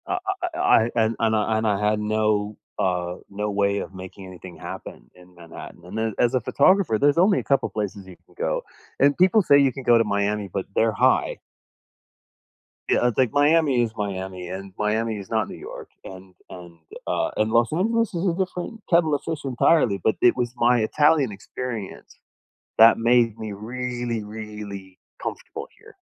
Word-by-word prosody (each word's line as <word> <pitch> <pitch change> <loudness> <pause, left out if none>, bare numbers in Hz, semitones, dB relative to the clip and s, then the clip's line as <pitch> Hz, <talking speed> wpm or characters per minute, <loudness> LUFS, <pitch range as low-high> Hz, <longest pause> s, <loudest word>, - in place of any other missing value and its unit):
Uh - - -1
uh 385 - 0
uh 345 -2 -6
uh, - - -4
I 115 - +4
and 115 -1 +2
and, 110 -1 +2
uh, 105 - +1
and 110 0 +1
I 105 -2 +2
had 105 0 0
no, 105 -1 0 0.2
uh, 90 -1 -1
no 105 +1 -3
way 100 0 +1
of - - -7
making 95 +1 -10
anything 90 -1 -11
happen - - -9
in 90 0 -19
Manhattan. 85 0 -12
And 95 +5 -8
then, 110 -1 -1
as 120 +1 +2
a 130 - +1
photographer, 150 - +3
there's 145 +5 +3
only 190 +3 +4
a - - -5
couple 135 -1 +1
places 100 -2 -5
you 95 - -12
can - - -24
go. - - -2 0.4
And 140 +1 +4
people 190 +4 +5
say 140 -4 +5
you 135 -2 +3
can 135 +1 -8
go 120 -1 +5
to 115 - +3
Miami, 100 -1 -1
but 95 0 -3
they're 115 0 +3
high. - - +2 1.5
Yeah, - - +2
I - - +2
think 125 0 +1
Miami 145 -3 +3
is 115 - -2
Miami, 95 -3 -5
and 95 +1 -7
Miami 110 +1 -1
is 100 -2 -9
not 110 -2 0
New - - -9
York, - - -10
and 95 0 -11 0.2
and, 85 -2 -12 0.3
uh, - - -1
and 110 +1 +1
Los 115 0 +3
Angeles 225 +6 0
is 170 +2 -2
a 175 - +2
different 190 +4 -4
kettle 170 -3 +3
of 140 - -4
fish 160 -3 -5
entirely, 125 -4 +2
but 110 - +2
it 120 - +5
was 125 -1 -2
my 120 +1 +3
Italian 145 +2 +2
experience 110 +1 -7 0.6
that 115 +1 +7
made 115 -1 +3
me 110 -2 -5
really, 120 +1 -4
really 105 -3 -9 0.2
comfortable - - -6
here. - - -17
110 Hz, 190 wpm, -23 LUFS, 100-135 Hz, 1.5 s, that